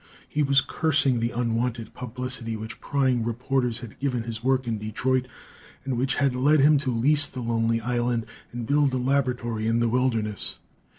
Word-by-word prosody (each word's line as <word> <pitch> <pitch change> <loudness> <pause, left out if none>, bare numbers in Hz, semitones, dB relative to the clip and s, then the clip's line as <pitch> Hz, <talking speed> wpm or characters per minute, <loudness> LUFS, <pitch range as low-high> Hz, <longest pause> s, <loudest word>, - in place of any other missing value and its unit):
He 150 - -1
was 140 -2 +4
cursing 140 -3 +1
the 115 +1 0
unwanted 120 0 -2
publicity 125 -2 -3
which 110 +1 -8
prying 130 -4 +1
reporters 120 +1 -1
had 120 -4 -10
given 125 -4 -1
his 115 -1 -6
work 130 0 +1
in 115 -2 -2
Detroit, 125 +5 -1 0.6
and 135 -2 -1
which 130 +2 0
had 140 -3 +1
led 145 +4 +4
him 145 +1 +5
to 135 -2 -2
lease 145 +5 +4
the 130 - -8
lonely 115 -1 0
island 120 -1 -1 0.3
and 120 -1 -5
build 140 +1 +2
a - - +1
laboratory 125 -4 0
in 115 +1 +2
the 120 0 +2
wilderness. 115 -4 0
125 Hz, 175 wpm, -25 LUFS, 115-135 Hz, 0.6 s, him